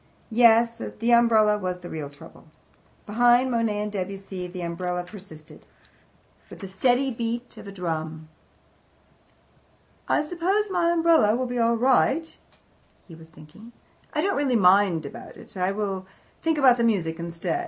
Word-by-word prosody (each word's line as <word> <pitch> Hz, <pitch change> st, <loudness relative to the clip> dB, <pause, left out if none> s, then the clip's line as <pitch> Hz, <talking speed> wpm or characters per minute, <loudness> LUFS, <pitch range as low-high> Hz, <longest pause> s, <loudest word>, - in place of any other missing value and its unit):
Yes, 230 Hz, 0 st, +4 dB, 0.2 s
the 235 Hz, +1 st, +2 dB
umbrella 220 Hz, -3 st, +4 dB
was 180 Hz, -2 st, -4 dB
the 175 Hz, -, -9 dB
real 150 Hz, -3 st, -6 dB
trouble. 145 Hz, +2 st, -16 dB, 0.6 s
Behind 240 Hz, +4 st, +3 dB
Monet 230 Hz, -3 st, 0 dB
and 210 Hz, 0 st, -4 dB
Debussy 195 Hz, -1 st, -5 dB
the 180 Hz, 0 st, -8 dB
umbrella 180 Hz, +1 st, -3 dB
persisted, 175 Hz, -5 st, -13 dB, 0.8 s
with -, -, -11 dB
the 195 Hz, -, -8 dB
steady 245 Hz, +7 st, +1 dB
beat 235 Hz, +1 st, -4 dB
of -, -, -11 dB
a -, -, -7 dB
drum. 160 Hz, -4 st, -5 dB, 1.8 s
"I -, -, +2 dB
suppose 370 Hz, +6 st, -1 dB
my 345 Hz, -2 st, +1 dB
umbrella 330 Hz, -10 st, +3 dB
will 255 Hz, +1 st, -1 dB
be 245 Hz, 0 st, -3 dB
all 230 Hz, 0 st, +2 dB
right," 270 Hz, +6 st, +1 dB, 0.7 s
he 170 Hz, -, -13 dB
was 160 Hz, 0 st, -14 dB
thinking. 165 Hz, +10 st, -16 dB, 0.4 s
"I -, -, -1 dB
don't 400 Hz, 0 st, 0 dB
really 275 Hz, -3 st, +1 dB
mind 185 Hz, -5 st, +4 dB
about 140 Hz, -, -10 dB
it. -, -, -15 dB
I 185 Hz, 0 st, 0 dB
will 195 Hz, -2 st, -4 dB, 0.3 s
think 325 Hz, -1 st, 0 dB
about 250 Hz, -4 st, +4 dB
music 175 Hz, -8 st, 0 dB
instead. 170 Hz, -, -3 dB
210 Hz, 150 wpm, -24 LUFS, 180-245 Hz, 1.8 s, Yes